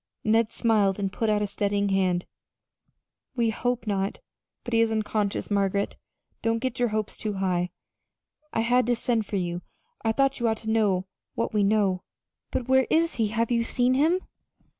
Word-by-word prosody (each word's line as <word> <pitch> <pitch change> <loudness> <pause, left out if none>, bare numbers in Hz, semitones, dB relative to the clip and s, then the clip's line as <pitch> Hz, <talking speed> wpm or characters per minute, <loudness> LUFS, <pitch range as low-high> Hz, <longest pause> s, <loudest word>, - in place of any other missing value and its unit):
Ned 225 +1 +3
smiled 210 -5 +2
and 195 -2 -2
put 225 - 0
out 210 -1 +2
a - - +1
steadying 200 0 0
hand. 185 -2 +1 1.1
"We 230 -3 +2
hope 245 +1 -1
not 200 -2 0
and - - +1
we - - -4
think - - -19
not. - - -62
But 240 - -5
he 230 - +5
is 225 -1 +2
unconscious, 210 -2 -1
Margaret. 200 0 +1 0.5
Don't 230 0 +1
get 250 +1 -3
your 245 - +3
hopes 215 -1 -2
too 215 -1 -3
high. 180 -2 0 0.8
I 225 - 0
had 245 +1 +3
to 245 - +3
send 230 -2 0
for - - -4
you 175 -2 -2 0.4
I 225 - +2
thought 275 +3 +1
you 240 - +1
ought 220 0 +1
to 220 0 -4
know 200 -4 +2 0.3
what 230 - -1
we 210 - +2
know." 200 -3 +2 0.5
"But 250 - -3
where 265 0 +4
is 330 -2 +2
he? 225 -2 +2
Have 230 +2 -1
you 235 -1 +3
seen 245 +2 +1
him?" 320 +7 +3
220 Hz, 200 wpm, -26 LUFS, 200-235 Hz, 1.1 s, he